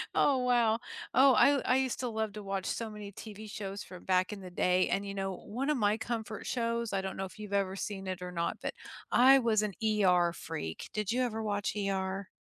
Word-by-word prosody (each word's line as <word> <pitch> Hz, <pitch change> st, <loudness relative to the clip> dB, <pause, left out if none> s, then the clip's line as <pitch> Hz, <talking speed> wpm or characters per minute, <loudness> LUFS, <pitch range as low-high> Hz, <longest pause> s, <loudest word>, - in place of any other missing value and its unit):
Oh 275 Hz, -3 st, +4 dB
wow. 240 Hz, -3 st, +3 dB, 0.3 s
Oh, 265 Hz, 0 st, +7 dB
I 280 Hz, -1 st, +5 dB
I 255 Hz, -, +2 dB
used 260 Hz, -1 st, -1 dB
to 250 Hz, -, -1 dB
love 220 Hz, -2 st, -2 dB
to 210 Hz, -1 st, -7 dB
watch 195 Hz, -1 st, -3 dB
so 230 Hz, -2 st, -2 dB
many 210 Hz, -2 st, -8 dB
TV 215 Hz, 0 st, -9 dB
shows 200 Hz, -1 st, -5 dB
from 180 Hz, -1 st, -11 dB
back 185 Hz, +2 st, +2 dB
in 200 Hz, -, -8 dB
the 185 Hz, -, -8 dB
day 180 Hz, +1 st, +2 dB
and 200 Hz, +2 st, 0 dB
you 200 Hz, -, -5 dB
know, 195 Hz, -1 st, -2 dB
one 255 Hz, +11 st, -4 dB
of 300 Hz, -, +2 dB
my 210 Hz, -1 st, +2 dB
comfort 225 Hz, -2 st, -4 dB
shows, 235 Hz, -2 st, -1 dB
I 195 Hz, -, 0 dB
don't 190 Hz, 0 st, -4 dB
know 195 Hz, -, -3 dB
if 185 Hz, +3 st, -12 dB
you've 205 Hz, -1 st, -7 dB
ever 195 Hz, -1 st, 0 dB
seen 195 Hz, -2 st, -4 dB
it 185 Hz, -1 st, -4 dB
or 180 Hz, -, -4 dB
not, 170 Hz, -1 st, -2 dB
but -, -, -3 dB, 0.4 s
I 265 Hz, +2 st, +7 dB
was 220 Hz, -3 st, +2 dB
an 210 Hz, -2 st, -2 dB
ER 185 Hz, -6 st, +3 dB
freak. 80 Hz, -, -6 dB
Did 210 Hz, -1 st, -1 dB
you 255 Hz, -, +1 dB
ever 225 Hz, -3 st, -1 dB
watch 205 Hz, -1 st, -1 dB
ER? 195 Hz, -1 st, -2 dB
205 Hz, 230 wpm, -31 LUFS, 190-230 Hz, 0.4 s, Oh